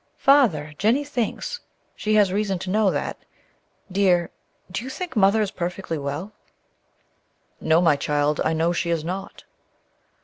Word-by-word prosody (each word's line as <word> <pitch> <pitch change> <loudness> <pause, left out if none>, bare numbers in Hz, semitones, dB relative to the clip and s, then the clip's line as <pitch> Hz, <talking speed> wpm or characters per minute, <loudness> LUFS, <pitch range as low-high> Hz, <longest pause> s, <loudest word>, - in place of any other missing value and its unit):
"Father 210 - +3
Jennie 230 +8 +2
thinks 290 - -3 0.4
she 215 0 0
has 200 -3 +4
reason 200 -2 0
to 185 +1 -5
know 210 0 +3
that - - -2 0.7
dear, 180 -3 +2 0.4
do 195 +5 -3
you 260 - -6
think 350 +1 -6
Mother 210 +1 +4
is 200 - -3
perfectly 175 -2 -4
well?" 145 +8 -4 1.3
"No, 160 +2 +3
my 165 -4 +4
child; 145 +1 0
I 160 - +1
know 165 +2 +1
she 175 0 -1
is 165 -2 0
not." 190 +4 -6
190 Hz, 145 wpm, -23 LUFS, 165-215 Hz, 1.3 s, has